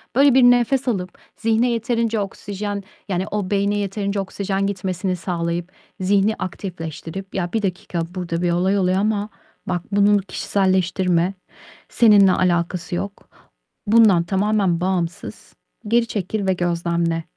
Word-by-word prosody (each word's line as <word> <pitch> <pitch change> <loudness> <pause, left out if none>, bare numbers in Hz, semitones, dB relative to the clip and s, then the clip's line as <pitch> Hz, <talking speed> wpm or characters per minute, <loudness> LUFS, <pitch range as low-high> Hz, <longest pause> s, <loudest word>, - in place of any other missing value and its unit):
Böyle, 275 -1 +6
bir 260 -1 +5
nefes 245 +2 +4
alıp 185 -6 -2 0.2
zihne 225 +2 +1
yeterince 230 -1 0
oksijen, 205 0 -4 0.3
yani, 185 0 -1
o 205 -3 -2
beyne 200 +1 +1
yeterince 200 0 -2
oksijen 195 0 -2
gitmesini 185 -1 -2
sağlayıp, 170 0 -3 0.3
zihni 200 +3 +2
aktifleştirip" 180 0 -6
Ya, 175 0 -2
1 220 - +1
dakika, 180 -3 -3
burada 170 -2 -3
bir 175 -1 +1
olay 190 +3 +1
oluyor 185 0 +2
ama 210 0 0 0.4
bak, 175 - -1
bunun 205 +1 +4
kişiselleştirme, 185 -2 0 0.6
seninle 205 -5 +6
alakası 175 0 0
yok. 200 +2 -6 0.6
Bundan 210 -6 +5
tamamen 190 -1 +1
bağımsız, 180 -2 -3 0.3
geri 230 +1 +2
çekil 200 0 -3
ve 190 - +3
gözlemle. 170 -1 -1
195 Hz, 130 wpm, -21 LUFS, 180-205 Hz, 0.6 s, Böyle